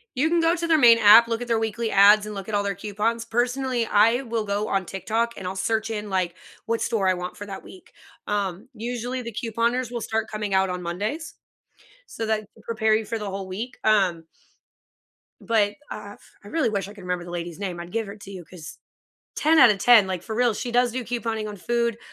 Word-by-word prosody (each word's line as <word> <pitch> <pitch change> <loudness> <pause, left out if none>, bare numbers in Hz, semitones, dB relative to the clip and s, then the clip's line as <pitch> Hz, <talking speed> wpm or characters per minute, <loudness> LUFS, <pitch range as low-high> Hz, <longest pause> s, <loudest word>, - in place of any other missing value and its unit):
You 300 +5 +2
can 340 0 +2
go 330 +1 +3
to 340 0 -3
their 320 -1 +4
main 235 -4 +7
app, 225 +2 +8
look 230 +1 -2
at 245 - -6
their 225 -1 +2
weekly 225 +1 -2
ads, 205 +1 +6
and 210 - -6
look 195 0 -7
at 215 - -2
all 205 - +1
their 200 0 -1
coupons, 215 +4 -2
personally, 245 +1 0
I 225 +5 +4
will 230 -4 -3
go 205 +1 -2
on 195 -2 0
TikTok, 225 +5 -2
and 190 - -8
I'll 190 +1 -4
search 220 +3 -1
in, 210 -2 -4
like, 185 -2 -1 0.3
what 230 0 -1
store 200 -5 +1
I - - +4
want 180 0 -5
for 205 - -8
that 195 -1 -8
week, 370 - -14 0.3
um, 205 +2 -3
usually, 245 +2 -4
the 235 -2 -7
couponers 235 +2 -1
will 240 - -3
start 220 0 -2
coming 210 -2 -3
out 190 0 +3
on 180 0 -4
Mondays. 215 - -4 0.7
So, 225 - -5
that 220 -1 +1
could 220 - -20
prepare 220 -1 +1
you 220 - -2
for 225 +1 -4
the 205 -2 -4
whole 195 0 -5
week, 220 +7 -6
um 190 -6 +2 1.2
but, 210 -3 +1 0.2
uh, 205 -1 -7
f - - -19 0.2
I - - -13
really 295 -2 0
wish 200 -2 -2
I 205 - -11
could 200 -3 -13
remember 180 -1 -3
the 175 - -9
lady's 175 0 -5
name, 180 -4 -4
I'd 175 +1 -8
give 225 -2 -2
her 200 - -8
to 200 -1 -11
you 185 -3 -8
'cause 165 -2 -11 0.6
10 315 +1 +3
out 235 - +9
of 200 - 0
10, 230 -4 +6
like, 185 -2 -4
for 220 - -6
real, 240 -2 +2
she 240 - -4
does 245 -1 +3
do 255 -1 -3
couponing 225 -2 -3
on 205 - -7
food, 235 +4 -1
215 Hz, 235 wpm, -24 LUFS, 195-235 Hz, 1.2 s, out